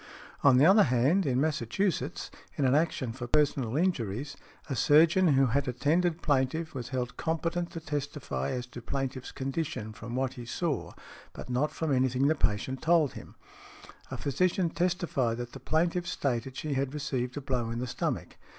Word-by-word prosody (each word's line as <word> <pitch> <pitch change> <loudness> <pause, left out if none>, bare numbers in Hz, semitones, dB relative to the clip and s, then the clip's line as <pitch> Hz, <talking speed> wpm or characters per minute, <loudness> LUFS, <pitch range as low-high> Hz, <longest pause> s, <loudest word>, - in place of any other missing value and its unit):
|98| 140 - +8
On 130 - +6
the 140 - +6
other 200 +4 +7
hand, 140 +8 +2
in 130 -1 +2
Massachusetts, 155 - -1 0.3
in 145 - +2
an 130 - +4
action 145 -6 +1
for 120 0 -6
personal 135 -3 +1
injuries, 140 - -1 0.3
a 135 - -2
surgeon 160 +5 +5
who 135 0 +5
had 135 +3 0
attended 160 +7 +1
plaintiff 145 +3 0
was 125 -3 -5
held 125 -1 -3
competent 165 +1 -1
to 165 - -6
testify 145 -2 -3
as 125 -2 -3
to 125 0 -10
plaintiff's 135 +1 -4
condition 135 -5 -3
from 115 +3 -7
what 130 0 -1
he 120 - -8
saw, 150 0 -2 0.4
but - - -8
not 135 +5 +1
from 160 -3 -2
anything 130 0 +2
the 150 - +4
patient 130 -1 -1
told 160 -4 +3
him. - - -11 0.7
A - - -5
physician 175 +4 +1
testified 170 -10 0
that 120 0 -5
the 135 - -9
plaintiff 170 +5 0
stated 130 -1 -2
she 150 -2 -2
had 135 +1 -1
received 130 -3 -2
a - - -3
blow 125 -4 -1
in 115 - -3
the 125 - -2
stomach. 120 - -3
140 Hz, 180 wpm, -29 LUFS, 125-160 Hz, 0.7 s, |98|